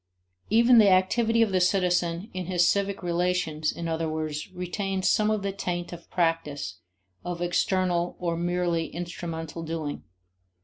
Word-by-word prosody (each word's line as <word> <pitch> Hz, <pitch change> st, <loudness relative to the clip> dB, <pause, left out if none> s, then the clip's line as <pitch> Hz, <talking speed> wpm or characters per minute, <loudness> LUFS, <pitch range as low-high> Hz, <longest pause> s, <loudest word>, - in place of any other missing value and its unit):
Even 235 Hz, +2 st, +6 dB
the 205 Hz, -2 st, +7 dB
activity 225 Hz, +5 st, +3 dB
of 215 Hz, -, -1 dB
the 185 Hz, -1 st, +2 dB
citizen 180 Hz, +1 st, +1 dB
in 185 Hz, -2 st, -4 dB
his 175 Hz, -2 st, +3 dB
civic 200 Hz, 0 st, 0 dB
relations, 175 Hz, -3 st, 0 dB
in 170 Hz, -, -5 dB
other 160 Hz, 0 st, -1 dB
words, 155 Hz, +1 st, -4 dB
retains 185 Hz, +1 st, -2 dB
some 215 Hz, 0 st, +3 dB
of 215 Hz, -2 st, 0 dB
the 200 Hz, -, -1 dB
taint 175 Hz, -3 st, -4 dB
of 170 Hz, -1 st, -11 dB
practice, 165 Hz, -, -1 dB, 0.4 s
of 175 Hz, 0 st, -4 dB
external 175 Hz, 0 st, 0 dB
or 170 Hz, -2 st, -1 dB
merely 175 Hz, -1 st, 0 dB
instrumental 165 Hz, -1 st, -6 dB
doing. 160 Hz, -2 st, -4 dB
175 Hz, 145 wpm, -26 LUFS, 165-190 Hz, 0.4 s, the